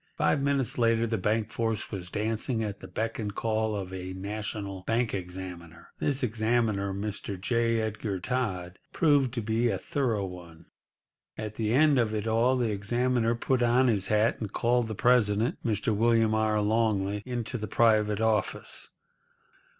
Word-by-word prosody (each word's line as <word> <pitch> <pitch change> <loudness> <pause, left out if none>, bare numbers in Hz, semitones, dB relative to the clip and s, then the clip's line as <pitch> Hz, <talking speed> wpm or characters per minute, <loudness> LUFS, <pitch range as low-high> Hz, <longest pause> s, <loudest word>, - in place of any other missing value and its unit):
Five 140 - +2
minutes 140 -3 0
later 115 -1 +3
the 115 -2 -1
bank 110 +2 0
force 115 -1 -2
was 90 -4 -5
dancing 110 +3 -1
at 100 -2 -4
the - - -9
beck 115 +2 -3
and 105 -2 -4
call 110 -1 0
of 95 -2 -5
a 95 0 -5
national 100 0 -5
bank 115 +1 +1
examiner. 90 -3 -7
This 140 -2 0
examiner, 110 -3 +1
Mr. 100 -1 -4
J. 115 +3 +1
Edgar 110 -3 -3
Todd, 95 -5 -3
proved 145 -5 +3
to 120 - -2
be 115 +2 +1
a 100 - 0
thorough 115 -1 -1
one. 85 -3 -10 0.7
At 105 -1 -5
the 110 0 -1
end 145 +1 +5
of 110 -2 +1
it 105 0 -2
all 115 +3 +3
the 120 -3 0
examiner 120 +3 +1
put 125 +2 0
on 120 +2 +4
his 100 -4 0
hat, 105 +1 +2
and 105 -3 -4
called 120 +1 +1
the 110 - -4
president, 115 -1 +2
Mr. 110 -1 0
William 115 0 +3
R. 110 -1 +2
Longley, 105 -2 +1
into 120 -1 -4
the 110 - -4
private 105 -1 +3
office. 110 -1 -1
110 Hz, 165 wpm, -28 LUFS, 100-120 Hz, 0.7 s, end